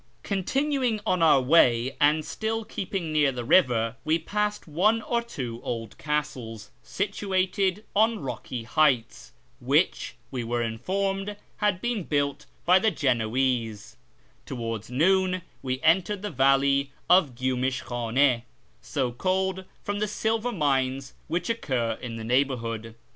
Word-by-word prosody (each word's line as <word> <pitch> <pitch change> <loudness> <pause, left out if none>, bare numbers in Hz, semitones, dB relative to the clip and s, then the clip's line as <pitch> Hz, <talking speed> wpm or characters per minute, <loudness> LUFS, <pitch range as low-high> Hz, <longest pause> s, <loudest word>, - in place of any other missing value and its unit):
Continuing 255 +4 0
on 185 -4 +1
our 160 -4 +6
way, 130 -3 +4
and 150 +1 +4
still 225 0 -3
keeping 180 -6 -4
near 150 -3 +3
the 125 -2 -5
river, 120 -6 +3
we 160 +1 +2
passed 210 +5 -2
one 195 +9 +2
or 235 0 0
two 125 - -6
old 115 -3 -4
castles, 135 -8 -3
situated 195 0 -1
on 220 +2 +3
rocky 125 -2 -5
heights, 125 0 +1 0.3
which, - - +1 0.2
we 125 -2 -3
were 120 +1 -1
informed, 195 - -2 0.2
had 205 -4 +1
been 240 -3 -1
built 145 -1 -1 0.2
by 180 +2 +6
the 220 - +3
Genoese 120 - -1 0.5
Towards 115 -4 -4
noon 185 +6 +2 0.2
we 130 -1 -2
entered 185 +5 +2
the 205 - -3
valley 135 +1 +3 0.2
of 170 -9 +4
Gyumish 130 +1 -1
Ivhane, 120 +1 +1 0.4
so 130 -4 -2
called 190 +6 -1 0.2
from 205 0 -2
the 210 - 0
silver 220 +3 -1
mines 135 - 0
which 170 +2 -2
occur 125 - -1
in 120 -2 -5
the 115 - -6
neighbourhood. 115 -3 -1
145 Hz, 130 wpm, -26 LUFS, 125-190 Hz, 0.5 s, our